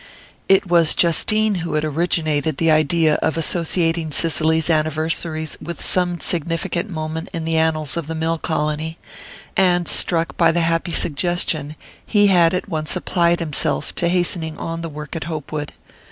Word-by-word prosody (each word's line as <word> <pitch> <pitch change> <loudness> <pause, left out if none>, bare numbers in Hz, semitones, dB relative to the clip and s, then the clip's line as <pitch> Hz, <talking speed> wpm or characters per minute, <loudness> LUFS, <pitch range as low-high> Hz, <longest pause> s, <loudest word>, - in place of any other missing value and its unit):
It 195 0 +5
was 170 -3 +3
Justine 215 +6 +3
who 165 -2 -3
had 155 0 0
originated 155 -2 0
the 165 +1 +2
idea 155 0 +3
of 160 0 0
associating 165 -1 0
Cicely's 160 0 +2
anniversaries 155 0 -1
with 170 -1 -6
some 180 -1 0
significant 170 +4 -2
moment 160 -1 -5
in 165 -1 -4
the 165 0 -1
annals 160 -2 0
of 170 -3 -4
the 160 - -4
mill 160 +1 -1
colony; 155 0 -2 0.6
and 180 -2 +3
struck 165 -1 +1
by 165 -1 +4
the 170 +1 0
happy 165 +1 0
suggestion, 155 -2 -1 0.3
he 205 -2 +3
had 170 -1 +4
at 180 - -3
once 155 -3 -1
applied 175 -1 +1
himself 150 -2 -2
to 170 - -1
hastening 170 -3 -1
on 165 0 -5
the 165 - -5
work 150 0 -8
at 160 - -4
Hopewood. 155 -2 -5
165 Hz, 155 wpm, -20 LUFS, 155-170 Hz, 0.6 s, It